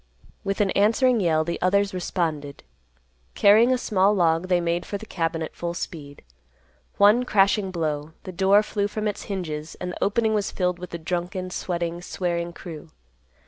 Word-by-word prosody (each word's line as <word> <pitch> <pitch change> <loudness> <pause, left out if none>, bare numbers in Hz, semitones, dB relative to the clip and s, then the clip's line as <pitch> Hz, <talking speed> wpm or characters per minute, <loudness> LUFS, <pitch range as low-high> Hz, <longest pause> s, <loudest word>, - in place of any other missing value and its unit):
With 195 +1 -1
an 195 -2 +2
answering 230 +4 +3
yell, 160 -4 +2
the 170 +1 -4
others 200 +2 +2
responded. 160 -6 -3 0.7
Carrying 220 +5 +6
a 255 - +3
small 205 -3 +2
log 170 -1 +2
they 180 -1 +3
made 170 0 -1
for 200 - -4
the 220 - -10
cabin 165 -4 -2
at 155 - -7
full 170 0 -4
speed. 145 -4 -7 0.7
One 210 +5 +5
crashing 200 -3 +2
blow—the 160 0 -4
door 195 +3 +4
flew 205 -1 -1
from 215 +1 -3
its 205 - -4
hinges, 160 -6 -5
and 180 - -5
the - - -4
opening 220 +2 +1
was 210 -1 0
filled 180 -1 -1
with 180 0 -7
the 170 - -5
drunken, 180 +2 -3
sweating, 170 -1 -3
swearing 175 -1 -3
crew. 165 -2 -10
180 Hz, 170 wpm, -24 LUFS, 170-200 Hz, 0.7 s, Carrying